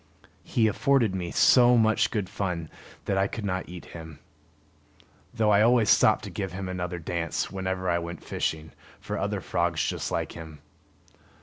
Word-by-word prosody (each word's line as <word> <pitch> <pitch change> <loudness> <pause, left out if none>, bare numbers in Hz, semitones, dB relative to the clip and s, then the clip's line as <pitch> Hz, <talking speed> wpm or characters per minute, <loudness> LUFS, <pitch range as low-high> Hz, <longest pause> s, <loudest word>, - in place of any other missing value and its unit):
He 115 - +1
afforded 115 -1 +2
me 90 -2 -3
so 125 +4 +5
much 110 -1 +3
good 105 -5 -2
fun 90 -5 -4 0.3
that 95 -1 0
I 100 - +2
could 110 +1 -6
not 95 -2 -3
eat 90 -1 -9
him; 80 -2 -9 1.1
though 110 -3 +1
I 100 0 +5
always 115 -1 +4
stopped - - +4
to - - -7
give 95 -2 -4
him 95 0 -5
another 90 -1 -4
dance, 85 0 -3
whenever 95 -1 -3
I 85 -1 +2
went 85 0 -7
fishing 80 0 -3 0.3
for - - -5
other - - -2
frogs - - 0
just - - -3
like - - -2
him. 80 -2 -10
95 Hz, 170 wpm, -26 LUFS, 85-110 Hz, 1.1 s, so